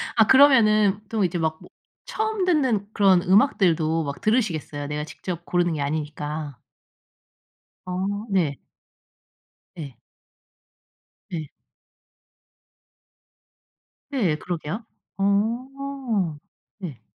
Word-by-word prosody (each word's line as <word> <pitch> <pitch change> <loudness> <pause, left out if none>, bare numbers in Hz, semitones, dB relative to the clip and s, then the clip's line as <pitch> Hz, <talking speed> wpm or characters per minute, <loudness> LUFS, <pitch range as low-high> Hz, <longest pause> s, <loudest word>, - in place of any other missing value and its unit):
아 220 -2 +5
그러면은 215 -7 +5
또 220 -3 0
이제 175 -1 0
막 160 -1 -1
뭐 - - -14 0.4
처음 435 -3 -1
듣는 260 - +1
그런 190 -3 +4
음악들도 175 - +3
막 140 -1 -5
들으시겠어요. 175 - -1
내가 150 +1 -3
직접 170 +2 -7
고르는 175 -1 +1
게 150 - -3
아니니까. 150 -1 -4 1.3
어 195 +4 -3
네. 165 -8 +1 1.2
예. 140 -5 -7 1.3
네. 160 -4 -4 2.6
네. 205 - +1
그러게요. 175 +6 -5 0.3
어. 230 - -1 0.4
네. 160 - -7
185 Hz, 175 characters per minute, -24 LUFS, 155-225 Hz, 2.6 s, 아